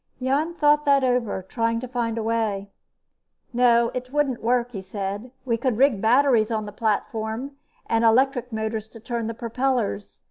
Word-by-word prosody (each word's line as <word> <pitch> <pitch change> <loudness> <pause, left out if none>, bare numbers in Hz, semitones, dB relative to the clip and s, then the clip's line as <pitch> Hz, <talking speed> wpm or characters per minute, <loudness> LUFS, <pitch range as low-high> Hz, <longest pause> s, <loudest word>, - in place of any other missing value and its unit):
Jan 285 +6 0
thought 295 -2 +3
that 280 -1 +4
over, 245 -6 0
trying 230 +4 -1
to 255 - -5
find 235 -2 -2
a 225 - -2
way. 215 -3 -1 0.8
"No, 235 -1 +4
it 255 0 -5
wouldn't 280 -4 0
work," 245 +1 +1
he 200 -5 -6
said. 200 +4 -5 0.2
"We 230 -3 +1
could 245 -1 -1
rig 260 -6 +3
batteries 240 -1 +4
on 220 -2 -2
the 205 - -7
platform 220 +3 -2 0.3
and 225 0 +1
electric 250 +2 +3
motors 220 0 -3
to 225 - -13
turn 235 0 -3
the 230 - -4
propellers. 235 -3 -2
235 Hz, 170 wpm, -24 LUFS, 220-255 Hz, 0.8 s, that